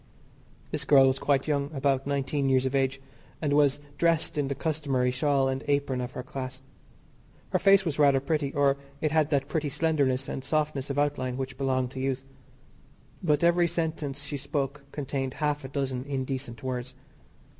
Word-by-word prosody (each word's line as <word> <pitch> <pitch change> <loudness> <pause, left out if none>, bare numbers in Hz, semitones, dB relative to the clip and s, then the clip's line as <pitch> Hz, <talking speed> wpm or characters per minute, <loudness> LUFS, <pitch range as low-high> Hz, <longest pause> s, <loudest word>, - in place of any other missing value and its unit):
This - - -2
girl 135 -2 +6
was 135 0 +2
quite 140 -1 +1
young 140 -2 0
about 135 0 +1
nineteen 140 0 0
years 130 0 +3
of 130 - -1
age 135 0 +1 0.4
and 145 -3 0
was 145 -1 +4 0.2
dressed 165 -1 +2
in 145 -2 0
the 140 - -2
customary 140 -5 0
shawl 135 +1 +2
and 135 +1 -2
apron 140 -3 +1
of 125 0 -5
her 125 - -5
class. 130 0 -6 0.9
Her - - +2
face 195 -1 +5
was 155 -3 -2
rather 140 -2 +5
pretty, 140 0 -1
or 140 -1 +3 0.2
it 155 0 0
had 155 -1 +3
that 140 -2 +1
pretty 155 -1 -1
slenderness 140 -3 +1
and 135 - -4
softness 145 -1 -1
of 140 - -2
outline 130 -3 0
which 135 -1 -4
belong 130 -1 0
to 130 - -7
youth. 135 0 -1 1.0
But 150 -2 +2
every 170 0 +4
sentence 155 -4 -3
she 145 0 -4
spoke 140 0 -3
contained 135 -2 -3
half 150 -1 -1
a - - -5
dozen 135 -2 -2
indecent 130 -4 -4
words. 130 0 -4
140 Hz, 175 wpm, -28 LUFS, 130-150 Hz, 1.0 s, girl